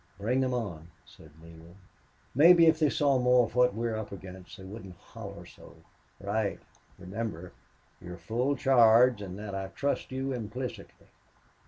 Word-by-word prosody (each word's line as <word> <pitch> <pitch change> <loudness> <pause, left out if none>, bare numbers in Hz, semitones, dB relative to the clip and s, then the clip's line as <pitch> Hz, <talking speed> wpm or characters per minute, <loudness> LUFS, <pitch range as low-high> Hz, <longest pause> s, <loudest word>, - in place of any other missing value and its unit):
"Bring 120 +7 0
them 130 -1 0
on," 90 -9 -5 0.2
said 80 - -17
Neale. 85 +1 -15 0.6
"Maybe 165 +5 +7
if 160 -1 +4
they 155 -2 +3
saw 140 -2 +2
more 125 -1 +4
of 110 - -11
what 125 -2 +3
we're 115 0 -2
up 110 -1 -6
against 95 -1 -11
they 95 - -12
wouldn't 95 -1 -10
holler - - -11
so." - - -16 0.4
"Right.... 100 +1 -2 0.4
Remember, 95 -2 -6 0.5
you've 90 0 -9
full 120 +10 -1
charge 120 -3 +5
and 95 -2 -7
that 105 -1 -7
I 95 0 -4
trust 140 +8 -3
you 135 +1 -3
implicitly. 125 +2 -7
110 Hz, 155 wpm, -29 LUFS, 95-125 Hz, 0.6 s, Maybe